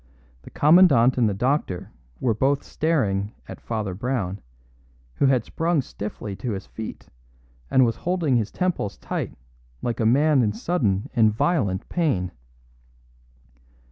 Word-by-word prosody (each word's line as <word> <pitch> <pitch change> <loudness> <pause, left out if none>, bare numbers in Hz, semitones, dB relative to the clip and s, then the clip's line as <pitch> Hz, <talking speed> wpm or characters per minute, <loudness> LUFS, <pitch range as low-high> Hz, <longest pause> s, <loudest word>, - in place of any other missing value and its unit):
The - - -13
Commandant 145 -7 +5
and 115 -3 +4
the - - -1
doctor 125 - -1 0.3
were 120 - +1
both 135 +6 +1
staring 105 -11 0
at - - -9
Father 110 -5 -3
Brown, 100 -3 -3 0.8
who 140 - +3
had 130 -4 +2
sprung 165 -1 0
stiffly 105 -3 -6
to 110 +3 -3
his 95 0 -6
feet, 110 -1 -8 0.6
and 130 -1 +5
was 115 - -1
holding 170 -7 0
his 110 -3 +1
temples 180 - -2
tight - - -4 0.5
like 120 -1 -2
a 115 - +1
man 140 +3 +4
in 105 -3 +1
sudden 110 - 0
and 110 -4 +4
violent 105 - 0
pain. 120 - 0
120 Hz, 140 wpm, -24 LUFS, 105-145 Hz, 0.8 s, Commandant